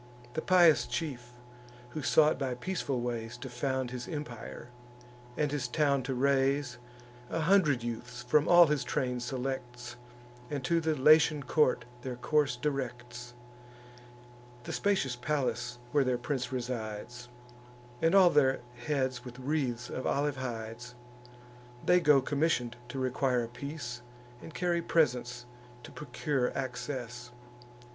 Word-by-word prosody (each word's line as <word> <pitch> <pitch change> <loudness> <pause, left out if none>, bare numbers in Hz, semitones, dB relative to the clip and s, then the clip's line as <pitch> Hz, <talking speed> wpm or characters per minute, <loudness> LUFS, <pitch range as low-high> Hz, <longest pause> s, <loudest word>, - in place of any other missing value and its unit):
The 160 - -2
pious 175 -4 +5
chief, 130 -7 -4 0.6
who 155 - -4
sought 150 +1 +4
by 130 -3 -1
peaceful 140 -3 -2
ways 120 -1 -4
To 125 +2 -7
found 130 0 -2
his 125 -1 -6
empire, 120 -6 -7 0.7
and 150 -2 +1
his 145 -4 -1
town 140 +1 +2
to 130 +1 -3
raise, 135 0 +1 0.5
A 165 - -1
hundred 155 -8 +3
youths 120 +1 -5
from 145 +4 +3
all 175 0 +8
his 150 -3 0
train 125 -1 -1
selects, 120 -1 -5 0.5
And 145 -3 -3
to 165 +5 +2
the 160 -1 0
Latian 150 +1 +5
court 125 -4 +2 0.2
their 125 0 -5
course 140 0 +1
directs, 120 -3 -4 1.3
(The - - -5
spacious 190 -11 +1
palace 125 -2 -2
where 145 -1 +3
their 125 -1 +1
prince 125 +2 -3
resides,) 120 -1 -5 0.7
And 165 +3 +3
all 185 -3 +7
their 135 -3 +3 0.3
heads 130 -4 0
with 125 -1 -10
wreaths 130 -3 -2
of 130 - -4
olive 145 0 0
hides. 120 -1 -6 0.9
They 180 - +5
go 150 -6 +5
commission'd 140 -5 0
to 135 - -6
require 130 -1 +1
a - - -4
peace, 125 -1 -6 0.4
And - - -9
carry 175 +1 0
presents 125 -7 +1 0.4
to - - -10
procure 145 -3 -2
access. 125 -2 -5
130 Hz, 135 wpm, -31 LUFS, 120-150 Hz, 1.3 s, all